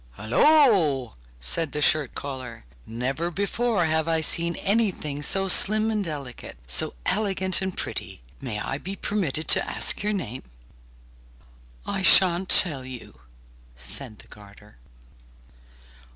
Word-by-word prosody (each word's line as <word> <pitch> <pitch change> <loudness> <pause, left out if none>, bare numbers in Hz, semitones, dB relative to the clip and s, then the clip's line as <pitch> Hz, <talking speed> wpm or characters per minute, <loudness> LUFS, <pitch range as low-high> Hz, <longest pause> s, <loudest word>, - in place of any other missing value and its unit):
'Hulloa!' 150 - +3 0.3
said 140 - -1
the 150 - -2
shirt 150 -5 +2
collar, 130 - -7 0.2
'never 130 +9 -3
before 200 +1 -1
have 160 0 0
I 165 -1 +1
seen 170 +2 +2
anything 195 -9 -1
so 195 +6 +3
slim 215 +4 +4
and 210 -2 -1
delicate, 140 -7 -7
so - - +1
elegant 190 -3 +1
and 190 -1 -4
pretty! - - -5 0.2
May 120 -6 -4
I 135 +6 -4
be 190 +5 -6
permitted 165 -8 -3
to - - +4
ask - - 0
your 210 +1 -1
name?' 130 - -5 1.4
'I 195 - -3
shan't 185 -1 +4
tell 150 -8 +3
you,' 125 - -10 0.6
said 110 - -4
the - - -16
garter. 105 -2 -16
160 Hz, 125 wpm, -24 LUFS, 130-195 Hz, 1.4 s, slim